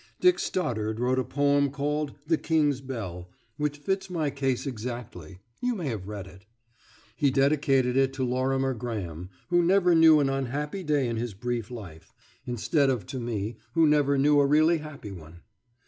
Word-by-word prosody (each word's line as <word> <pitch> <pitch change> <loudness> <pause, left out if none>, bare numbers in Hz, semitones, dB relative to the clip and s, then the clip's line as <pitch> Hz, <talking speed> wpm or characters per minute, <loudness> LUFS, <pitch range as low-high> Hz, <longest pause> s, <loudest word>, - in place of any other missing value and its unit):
Dick 360 -1 +4
Stoddard 110 -10 -2
wrote 125 +1 +1
a - - +1
poem 140 +1 +2
called 145 +1 -2
"The 160 +1 +1
King's 150 -4 +1
Bell," 95 -10 -6 0.3
which 150 -1 -1
fits 190 +5 -2
my 160 -5 -1
case 135 -2 -1
exactly 110 - -7 0.2
(you 245 -1 0
may 170 -8 -3
have 105 -5 -5
read 105 -2 -6
it). 95 +2 -16 0.7
He 140 - +2
dedicated 135 -2 +2
it 135 0 +3
to 130 - -2
Lorimer 130 +1 0
Graham, 95 -8 -5 0.2
who 175 0 +4
never 180 0 +4
knew 160 -2 +7
an 140 - +2
unhappy 140 +6 -2
day 145 -5 +1
in 115 -1 -2
his 115 -3 -4
brief 120 0 -3
life, 95 -10 -10 0.3
instead 135 +4 +1
of 125 -5 -1
to 130 - -5
me, 110 -2 -3 0.2
who 165 -1 +4
never 145 -2 +3
knew 145 +1 +4
a 140 - +4
really 155 +3 +4
happy 150 -9 -9
one. 85 -2 -12
135 Hz, 175 wpm, -27 LUFS, 115-150 Hz, 0.7 s, knew